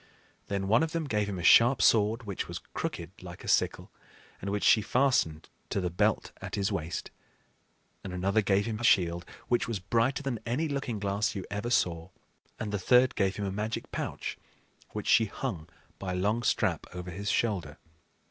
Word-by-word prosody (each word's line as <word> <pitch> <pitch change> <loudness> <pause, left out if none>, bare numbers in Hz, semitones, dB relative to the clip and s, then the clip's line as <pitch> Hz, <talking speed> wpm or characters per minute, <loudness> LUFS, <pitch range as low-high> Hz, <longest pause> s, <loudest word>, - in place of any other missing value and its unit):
Then 100 -1 -2
one 110 +4 +4
of 160 0 -1
them 165 -2 -1
gave 105 -6 0
him 95 - -4
a 90 - -5
sharp 120 +7 +7
sword, 110 +2 +3
which 100 -4 -4
was - - -5 0.2
crooked - - -5
like - - -10
a - - -9
sickle, - - +1 0.5
and 100 - -3
which 100 0 -1
she 110 - +6
fastened 105 - +1 0.2
to - - -1
the 90 -2 -2
belt 85 - +1
at - - -5
his 100 +1 0
waist; 85 -4 -3 0.9
and 95 - -6
another 95 +4 +1
gave 100 0 +2
him 110 -2 -3
a - - -6
shield, 85 -5 +3 0.2
which 120 - +1
was 115 -2 -2
brighter 115 +9 0
than 130 -5 -2
any 130 +8 -1
looking 135 -6 -3
glass 100 +1 -1
you 95 - -4
ever 105 +3 -2
saw; 85 -7 +1 0.5
and 105 -2 -3
the 105 - -1
third 125 +6 +4
gave 95 -2 +1
him 100 - -3
a 95 - -2
magic 105 +3 -4
pouch, - - -4 0.5
which - - -5
she 115 - +5
hung 95 -7 -5 0.3
by 95 -2 -3
a - - -2
long 105 +5 +1
strap 120 - 0
over 90 0 -6
his 100 +4 -4
shoulder. 90 -11 0
105 Hz, 195 wpm, -29 LUFS, 95-115 Hz, 0.9 s, sharp